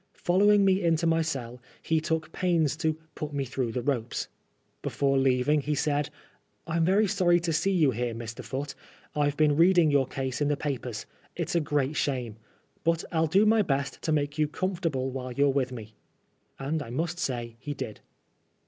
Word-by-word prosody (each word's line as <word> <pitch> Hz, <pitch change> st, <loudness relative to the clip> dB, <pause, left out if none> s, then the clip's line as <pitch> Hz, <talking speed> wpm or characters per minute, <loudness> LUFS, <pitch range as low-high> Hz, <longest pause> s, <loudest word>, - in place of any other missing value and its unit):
Following 200 Hz, +3 st, +4 dB
me 190 Hz, 0 st, +3 dB
into 165 Hz, 0 st, +2 dB
my 165 Hz, 0 st, +3 dB
cell, 125 Hz, -6 st, -4 dB, 0.2 s
he 160 Hz, -1 st, +1 dB
took 160 Hz, 0 st, -2 dB
pains 165 Hz, -5 st, +1 dB
to 160 Hz, -2 st, 0 dB
'* 155 Hz, -, -37 dB
put 150 Hz, -1 st, -5 dB
me 140 Hz, -1 st, -1 dB
through 130 Hz, -2 st, -2 dB
the 120 Hz, +1 st, -3 dB
ropes." 125 Hz, -4 st, -2 dB, 0.5 s
Before 140 Hz, -1 st, 0 dB
leaving 135 Hz, +2 st, +3 dB
he 150 Hz, +1 st, -1 dB
said, 145 Hz, 0 st, 0 dB, 0.3 s
" -, -, -44 dB
I'm 165 Hz, 0 st, 0 dB
very 195 Hz, +5 st, +4 dB
sorry 180 Hz, -3 st, +3 dB
to 170 Hz, -1 st, -1 dB
see 175 Hz, +5 st, +1 dB
you 160 Hz, -8 st, +4 dB
here, 120 Hz, 0 st, -2 dB
Mr. 115 Hz, 0 st, -7 dB
Foote. 140 Hz, +2 st, -4 dB, 0.4 s
I've 145 Hz, -1 st, +1 dB
been 150 Hz, -2 st, +4 dB
reading 170 Hz, -1 st, +5 dB
your 140 Hz, -3 st, +3 dB
case 130 Hz, 0 st, -3 dB
in 145 Hz, -, +3 dB
the 145 Hz, -1 st, +1 dB
papers. 125 Hz, -7 st, -4 dB, 0.3 s
It's -, -, -3 dB
a 170 Hz, -, +3 dB
great 145 Hz, -2 st, 0 dB
shame. 125 Hz, -7 st, -1 dB, 0.5 s
But 165 Hz, 0 st, +1 dB
I'll 160 Hz, -1 st, +2 dB
do 195 Hz, +7 st, +4 dB
my 220 Hz, +1 st, +5 dB
best 140 Hz, -7 st, -1 dB
to 160 Hz, -, -1 dB
make 145 Hz, 0 st, 0 dB
you 155 Hz, -, +3 dB
comfortable 165 Hz, -6 st, -2 dB
while 130 Hz, -1 st, -5 dB
you're 140 Hz, +3 st, +3 dB
with 130 Hz, -2 st, 0 dB
me." 110 Hz, -3 st, -8 dB, 0.6 s
And 150 Hz, +4 st, -2 dB
I 135 Hz, -, -7 dB
must 165 Hz, +7 st, -2 dB
say 120 Hz, -6 st, -3 dB
he 145 Hz, +2 st, -5 dB
did. 110 Hz, -5 st, -6 dB
145 Hz, 195 wpm, -28 LUFS, 130-165 Hz, 0.6 s, reading